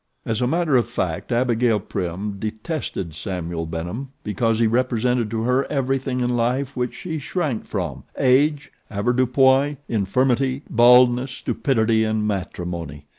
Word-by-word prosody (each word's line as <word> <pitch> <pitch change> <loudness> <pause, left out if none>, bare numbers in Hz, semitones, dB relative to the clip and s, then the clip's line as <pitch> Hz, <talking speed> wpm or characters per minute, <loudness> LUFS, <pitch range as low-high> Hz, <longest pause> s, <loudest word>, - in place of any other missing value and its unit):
As 115 +1 -1
a 125 - +2
matter 165 0 +1
of 120 -1 0
fact 90 -7 -3
Abigail 120 -2 +2
Prim 95 +2 -4
detested 110 - -4
Samuel 85 0 -4
Benham 85 +11 -5
because 110 +2 0
he 115 - +3
represented 125 0 +1
to 110 0 -2
her 125 +3 +2
everything 135 -2 -1
in 125 0 +1
life 125 +3 0
which 125 -1 -2
she 160 -3 -5
shrank 145 -5 -2
from - - -4
age, 140 +3 +2 0.2
avoirdupois, 130 +6 +3
infirmity, 130 +6 +1
baldness, 125 +2 +5
stupidity, 115 -6 +1
and 110 -1 0
matrimony. 90 -6 -4
120 Hz, 130 wpm, -22 LUFS, 105-130 Hz, 0.2 s, baldness